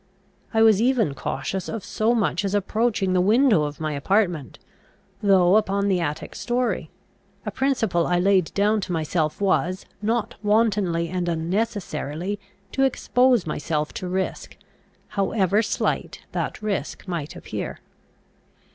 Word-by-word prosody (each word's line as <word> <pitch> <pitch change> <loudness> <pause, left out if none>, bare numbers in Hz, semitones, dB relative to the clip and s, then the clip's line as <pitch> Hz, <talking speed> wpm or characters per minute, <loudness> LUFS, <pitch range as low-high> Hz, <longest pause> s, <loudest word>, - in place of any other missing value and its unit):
I 225 -1 +4
was 220 -2 +5
even 235 - +2
cautious 190 +7 -3
of 225 -4 -5
so 225 +2 +1
much 210 -4 +1
as 200 0 -1
approaching 205 -1 +1
the 180 - +3
window 215 - +4
of 145 0 -6
my 155 -1 -2
apartment, 175 - 0 0.6
though 195 -1 +5
upon 200 -1 +1
the 185 -2 +2
attic 150 -3 -3
story; 245 0 -1 0.6
a - - -2
principle 225 -11 +1
I 175 - +2
laid 185 -1 +3
down 210 +1 +2
to 185 - -5
myself 160 -1 -1
was, 185 -2 +1 0.2
not 225 +2 0
wantonly 205 -6 +2
and 180 0 -1
unnecessarily 175 0 -2 0.3
to 270 - -1
expose 255 -3 +3
myself 150 0 -2
to 185 - -5
risk, 185 +1 -3 0.5
however 200 0 +1
slight 225 - -2
that - - -3
risk 205 -1 -3
might 165 -5 -4
appear. - - -5
195 Hz, 135 wpm, -24 LUFS, 175-220 Hz, 0.6 s, was